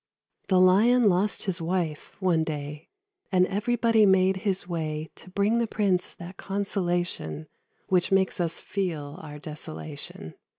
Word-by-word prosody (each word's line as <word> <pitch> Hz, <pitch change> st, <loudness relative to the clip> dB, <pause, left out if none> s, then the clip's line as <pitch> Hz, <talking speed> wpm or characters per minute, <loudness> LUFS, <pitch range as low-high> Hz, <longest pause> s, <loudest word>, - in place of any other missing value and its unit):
The 185 Hz, -2 st, +4 dB
Lion 215 Hz, +6 st, +5 dB
lost 195 Hz, +2 st, +2 dB
his 190 Hz, -3 st, -2 dB
wife, 165 Hz, -3 st, -3 dB
one 175 Hz, -4 st, +2 dB
day; 150 Hz, -1 st, -6 dB, 0.4 s
And 185 Hz, -1 st, +4 dB
everybody 230 Hz, +2 st, +2 dB
made 190 Hz, -1 st, +4 dB
his 190 Hz, -2 st, -1 dB
way 155 Hz, -2 st, -3 dB
To -, -, -13 dB
bring 205 Hz, +5 st, +1 dB
the 235 Hz, -, +1 dB
prince 195 Hz, -5 st, 0 dB
that 175 Hz, +1 st, -10 dB
consolation 175 Hz, -, -2 dB, 0.4 s
Which 180 Hz, -1 st, +2 dB
makes 190 Hz, -1 st, +2 dB
us 170 Hz, -1 st, -1 dB
feel 160 Hz, -8 st, -4 dB
our 150 Hz, -2 st, -9 dB
desolation. 150 Hz, -, -6 dB
185 Hz, 135 wpm, -26 LUFS, 160-195 Hz, 0.4 s, Lion